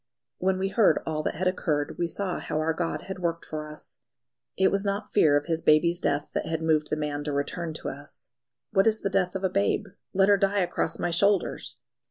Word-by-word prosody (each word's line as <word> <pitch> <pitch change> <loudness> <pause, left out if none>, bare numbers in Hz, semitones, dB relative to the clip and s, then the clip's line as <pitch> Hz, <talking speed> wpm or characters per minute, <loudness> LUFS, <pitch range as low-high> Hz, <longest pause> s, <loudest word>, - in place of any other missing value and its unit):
When 190 +1 +1
we 190 +1 -1
heard 200 -6 +4
all 155 -1 -1
that - - -2
had 185 +4 0
occurred 150 -5 -1
we 170 - +1
saw 185 +2 -3
how - - -3
our 160 +1 +1
God 165 0 -2
had 190 -1 -6
worked 170 -1 -2
for 155 -1 -5
us. 150 0 -10 0.6
It 190 - +4
was 200 0 +1
not 200 +1 -3
fear 150 -8 +5
of 145 - -2
his 165 -1 -1
baby's 170 +3 +4
death 145 -4 -1
that - - -2
had 160 0 -2
moved 155 -2 +2
the - - +1
man 150 -1 -3
to 150 - -1
return 145 +4 -2
to - - -4
us. 145 0 -8 0.4
"What 195 0 +4
is 220 0 +2
the 195 - -1
death 180 -1 +1
of 190 - -3
a - - +4
babe? 200 +2 +1 0.3
Let 195 0 +3
her 205 0 +6
die 195 +1 +2
across 175 -2 -1
my 175 - -1
shoulders!" 200 +2 +1
170 Hz, 230 wpm, -27 LUFS, 155-195 Hz, 0.6 s, her